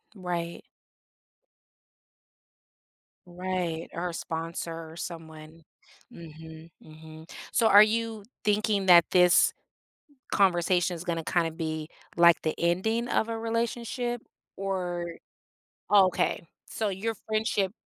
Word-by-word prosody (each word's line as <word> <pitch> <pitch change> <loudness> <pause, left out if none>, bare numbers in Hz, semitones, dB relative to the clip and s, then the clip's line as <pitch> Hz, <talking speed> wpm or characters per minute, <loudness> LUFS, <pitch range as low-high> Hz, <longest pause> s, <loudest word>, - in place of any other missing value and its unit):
Right. 175 -3 -4 2.7
Right. 180 -2 -3
Or 175 +1 -3
a - - -6
sponsor 165 0 -5
or - - -12
someone. 160 -1 -9 0.5
Mhm, 160 0 -12
mhm. 160 +1 -13 0.2
So, 225 - +3
are 205 0 +9
you 225 0 -2 0.2
thinking 210 -1 +1
that 175 -2 +8
this 180 -1 +5 0.8
conversation 180 -2 +2
is 170 - -8
gonna 165 -3 -2
kinda 170 -2 +1
be, 160 -1 -4 0.3
like, 170 -1 +6
the 155 - -1
ending 220 +8 0
of 220 - 0
a 225 0 -3
relationship 235 +1 -2 0.3
or 180 -3 -3 0.8
Oh, 200 -2 +7
okay. 175 -1 -1 0.2
So, 215 -2 -2
your 220 +4 -3
friendship 215 -2 -1
180 Hz, 110 wpm, -27 LUFS, 165-210 Hz, 2.7 s, are